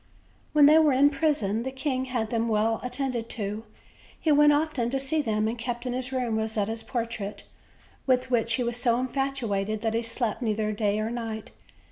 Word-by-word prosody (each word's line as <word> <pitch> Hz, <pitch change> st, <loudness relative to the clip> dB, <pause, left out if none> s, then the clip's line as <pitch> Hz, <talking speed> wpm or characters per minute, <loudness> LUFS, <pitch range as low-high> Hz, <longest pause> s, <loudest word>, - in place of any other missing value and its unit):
When 300 Hz, -1 st, +6 dB
they 305 Hz, +2 st, +7 dB
were 305 Hz, -3 st, +4 dB
in 280 Hz, +3 st, +5 dB
prison'the 265 Hz, -6 st, 0 dB
king 260 Hz, -1 st, -2 dB
had 240 Hz, -4 st, -2 dB
them 230 Hz, -1 st, 0 dB
well 220 Hz, 0 st, +1 dB
at 250 Hz, 0 st, -5 dB
tended 250 Hz, -4 st, -2 dB
to; 210 Hz, +1 st, -4 dB, 0.5 s
he 315 Hz, -, +1 dB
went 295 Hz, 0 st, +6 dB
often 290 Hz, -5 st, 0 dB
to 270 Hz, +2 st, -1 dB
see 275 Hz, +4 st, +1 dB
them, 215 Hz, -4 st, 0 dB
and 230 Hz, +1 st, -3 dB
kept 240 Hz, +1 st, -4 dB
in 250 Hz, -, -2 dB
his 255 Hz, +1 st, -2 dB
room 245 Hz, -4 st, -1 dB
Rosetta's 220 Hz, 0 st, -2 dB
portrait, 230 Hz, -5 st, -4 dB, 0.6 s
with 255 Hz, 0 st, +2 dB
which 230 Hz, -1 st, +2 dB
he 250 Hz, -, +1 dB
was 235 Hz, 0 st, -1 dB
so 240 Hz, -1 st, +2 dB
infatuated 240 Hz, -6 st, -2 dB
that 225 Hz, -1 st, -1 dB
he 230 Hz, -, +1 dB
slept 230 Hz, -1 st, -1 dB
neither 215 Hz, -2 st, 0 dB
day 210 Hz, 0 st, 0 dB
nor 220 Hz, +1 st, -2 dB
night. 225 Hz, -2 st, -5 dB
235 Hz, 190 wpm, -27 LUFS, 220-265 Hz, 0.6 s, they